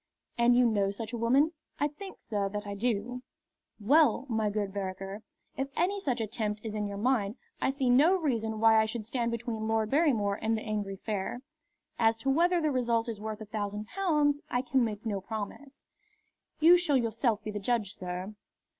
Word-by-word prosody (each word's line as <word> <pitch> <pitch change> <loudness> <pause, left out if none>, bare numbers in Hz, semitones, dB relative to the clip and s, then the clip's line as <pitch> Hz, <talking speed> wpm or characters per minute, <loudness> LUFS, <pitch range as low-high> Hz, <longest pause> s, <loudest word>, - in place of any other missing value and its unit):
"And 240 0 +4
you 250 0 +5
know 205 -4 +2
such 220 +3 -6
a - - -2
woman?" 265 +7 +3 0.3
"I 290 - +2
think, 375 +7 -10
sir, 200 -3 -1
that 205 +1 -4
I 200 - -4
do." 235 +3 -2 0.6
"Well, 270 +2 +4
my 220 -2 +1
good 205 -2 -2
Vereker, 195 +1 -5 0.3
if 270 - -2
any 385 +4 +1
such 260 -10 -1
attempt 215 -1 -2
is 220 - -4
in 210 -1 -2
your 200 0 -5
mind, 215 -2 +1 0.3
I - - +2
see 270 -1 -1
no 285 +10 +5
reason 230 - -1
why 220 0 +6
I 220 - 0
should 220 -1 -4
stand 235 +1 -1
between 230 -2 -3
Lord 220 -1 0
Barrymore 235 -10 +2
and 225 0 +1
the 215 - -5
angry 205 -2 -3
fair. 210 +5 -4 0.6
As 225 -1 +4
to 270 +4 0
whether 345 +5 +3
the 310 -2 +1
result 235 -3 +1
is 220 -3 -5
worth 220 0 -5
a - - -6
thousand 210 0 -4
pounds, 300 -7 +1
I 245 +1 0
can 260 0 +2
make 220 -1 -3
no 205 -3 -2
promise." 220 +7 -7 0.7
"You 335 +3 +8
shall 310 -6 +2
yourself 230 -2 0
be 215 - -4
the 210 - -4
judge, 210 -1 -1
sir." 180 +3 -5
225 Hz, 195 wpm, -30 LUFS, 210-265 Hz, 0.7 s, You